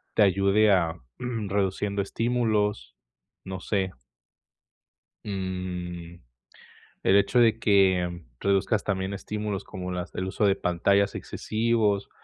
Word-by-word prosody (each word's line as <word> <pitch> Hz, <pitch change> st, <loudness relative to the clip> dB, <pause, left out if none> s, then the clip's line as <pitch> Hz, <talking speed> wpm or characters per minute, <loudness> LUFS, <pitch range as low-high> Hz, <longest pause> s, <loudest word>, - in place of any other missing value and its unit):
te -, -, +3 dB
ayude 100 Hz, +2 st, +4 dB
a, 85 Hz, -3 st, +1 dB, 0.2 s
mm, 115 Hz, -5 st, -4 dB
reduciendo 100 Hz, +1 st, 0 dB
estímulos. 105 Hz, -, 0 dB, 0.5 s
No 95 Hz, -1 st, -5 dB
sé. 95 Hz, -2 st, -1 dB, 1.3 s
Mm, 90 Hz, -3 st, -5 dB, 0.9 s
el 95 Hz, -, +5 dB
hecho 120 Hz, +5 st, +3 dB
de 115 Hz, -1 st, +4 dB
que 95 Hz, -4 st, +3 dB, 0.2 s
reduzcas 100 Hz, +2 st, +1 dB
también 95 Hz, -1 st, -1 dB
estímulos, 105 Hz, 0 st, -4 dB
como 90 Hz, -2 st, -6 dB
las 90 Hz, -1 st, -4 dB
del 95 Hz, -, -3 dB
uso 100 Hz, +2 st, 0 dB
de 100 Hz, -1 st, +4 dB
pantallas 100 Hz, +2 st, +1 dB
excesivos, 110 Hz, -2 st, 0 dB
100 Hz, 115 wpm, -26 LUFS, 95-105 Hz, 1.3 s, el